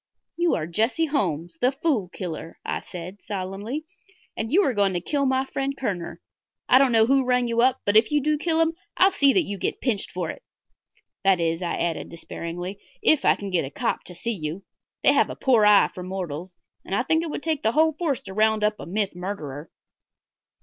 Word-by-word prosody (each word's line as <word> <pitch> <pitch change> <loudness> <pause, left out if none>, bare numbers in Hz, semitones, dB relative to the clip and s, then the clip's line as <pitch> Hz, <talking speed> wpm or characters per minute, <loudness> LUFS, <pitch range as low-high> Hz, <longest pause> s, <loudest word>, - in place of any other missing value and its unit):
"You 345 0 +2
are 155 - -2
Jesse 225 - +1
Holmes, 175 - -2
the 250 - +4
Fool 270 - 0
Killer," 165 -3 -6
I - - -2
said, 180 +3 -9
solemnly, 205 +9 -5 0.5
"and 225 +1 -3
you 390 +6 +5
are 270 - +1
going 200 -3 +2
to 175 - 0
kill 280 - 0
my 260 0 +1
friend 275 +1 -3
Kerner. 185 -9 -4 0.5
I 255 - +7
don't 270 -2 +4
know 225 -1 +5
who 270 +2 +3
rang 250 -1 +2
you 235 0 +1
up, 260 +1 +3
but 205 - +1
if 220 +4 +5
you 295 - +3
do 300 +1 0
kill 325 0 +2
him 325 0 +2 0.2
I'll 380 +1 +6
see 280 -7 +5
that 370 - +3
you 200 -8 -5
get - - -2
pinched 225 -7 -1
for 175 -3 -3
it. - - -12 0.8
That 195 -2 +4
is," 165 +1 0
I 175 - -1
added, 170 -1 -2
despairingly, 175 +3 -6 0.2
"if 310 - +4
I - - +5
can 200 -1 -6
get 180 - +1
a 135 - -5
cop - - -2
to 180 - -9
see 235 +7 -3
you. 165 0 -5 0.4
They - - +6
have - - +3
a - - -5
poor 235 -6 +4
eye 210 -1 +6
for 180 - -7
mortals, 180 -2 -5 0.3
and 195 - -3
I 245 - +1
think 320 +4 +2
it 330 - -3
would 295 - -5
take 315 -3 -1
the 220 - +1
whole 315 +1 +4
force 300 -5 -2
to 195 - -8
round 215 +1 +2
up 210 0 +1
a - - -8
myth 200 +1 -1
murderer." 165 -6 -6
215 Hz, 220 wpm, -24 LUFS, 180-275 Hz, 0.8 s, I